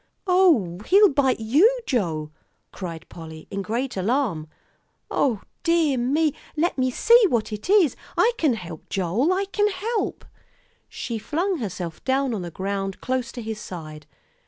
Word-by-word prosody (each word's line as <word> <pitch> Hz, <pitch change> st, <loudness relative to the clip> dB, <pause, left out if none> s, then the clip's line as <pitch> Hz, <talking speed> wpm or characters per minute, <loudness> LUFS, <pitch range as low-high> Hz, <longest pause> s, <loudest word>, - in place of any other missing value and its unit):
"Oh, 335 Hz, -, +3 dB
he'll 405 Hz, +2 st, +7 dB
bite 270 Hz, -4 st, +2 dB
you, 320 Hz, -, +4 dB
Joe," 160 Hz, -, -1 dB, 0.4 s
cried 170 Hz, -4 st, -7 dB
Polly, 160 Hz, -1 st, -10 dB
in 200 Hz, -, -2 dB
great 235 Hz, +7 st, -2 dB
alarm. 195 Hz, -, 0 dB, 0.6 s
"O 235 Hz, -8 st, +1 dB, 0.2 s
dear 335 Hz, -4 st, +2 dB
me, 280 Hz, +5 st, +1 dB, 0.2 s
let 340 Hz, +4 st, +1 dB
me 255 Hz, -1 st, +1 dB
see 465 Hz, -, +5 dB
what 225 Hz, -4 st, 0 dB
it 210 Hz, -, -6 dB
is! 390 Hz, -, +5 dB, 0.2 s
I 465 Hz, -, +5 dB
can 290 Hz, -7 st, +3 dB
help, 170 Hz, -6 st, -9 dB
Joel, 200 Hz, -, +1 dB
I 385 Hz, +2 st, +1 dB
can 415 Hz, +1 st, +1 dB
help." 425 Hz, +4 st, -3 dB, 0.6 s
She 230 Hz, -2 st, -4 dB
flung 350 Hz, -, -1 dB
herself 180 Hz, -7 st, -5 dB
down 265 Hz, -1 st, +1 dB
on 210 Hz, -, -3 dB
the 175 Hz, -, -5 dB
ground 195 Hz, +2 st, -3 dB
close 255 Hz, -2 st, -2 dB
to 240 Hz, -, -6 dB
his 220 Hz, -1 st, -5 dB
side. 155 Hz, -6 st, -8 dB
245 Hz, 155 wpm, -24 LUFS, -, 0.6 s, he'll